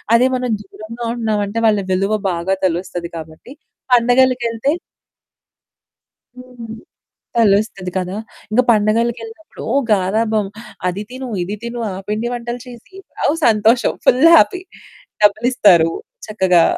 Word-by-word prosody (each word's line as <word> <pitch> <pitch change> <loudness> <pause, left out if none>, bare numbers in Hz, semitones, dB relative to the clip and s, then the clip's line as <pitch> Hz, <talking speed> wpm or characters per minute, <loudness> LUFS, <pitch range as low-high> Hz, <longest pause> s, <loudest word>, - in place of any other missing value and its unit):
అదే 250 +2 +4
మనం 250 -1 -2
దూరంగా 225 +4 -9
ఉంటున్నామంటే, 220 -2 -2
వాళ్ళ 210 -2 +3
విలువ 195 +3 0 0.2
బాగా 175 +2 -1
తెలుస్తది 175 -1 -3
కాబట్టి 160 - -11 0.4
పండగలకేళ్తే 245 0 +2 1.6
హ్మ్. 250 -3 -10 0.6
తెలుస్తది 200 -4 +2
కదా! 185 +1 -2 0.3
ఇంగ 220 +3 +4
పండగలకేళ్ళినప్పుడు. 225 +4 -1
ఓ - - 0 0.2
గరాబం, 215 +2 +1 0.4
అది 180 +3 -2
తిను, 255 0 -7
ఇది 195 +4 -4
తిను, 235 0 -5
ఆ - - -5 0.2
పిండి 215 +3 -1
వంటలు 240 0 -5
చేసి 245 - -13 0.3
అవ్ 295 - +3
సంతోషం 225 +2 +3
ఫుల్ 255 +5 +4
హ్యాపీ 370 +1 +3 0.6
డబ్బులిస్తారు 210 -6 +4 0.4
చక్కగా. 185 -5 +3
220 Hz, 110 wpm, -18 LUFS, 195-240 Hz, 1.6 s, అదే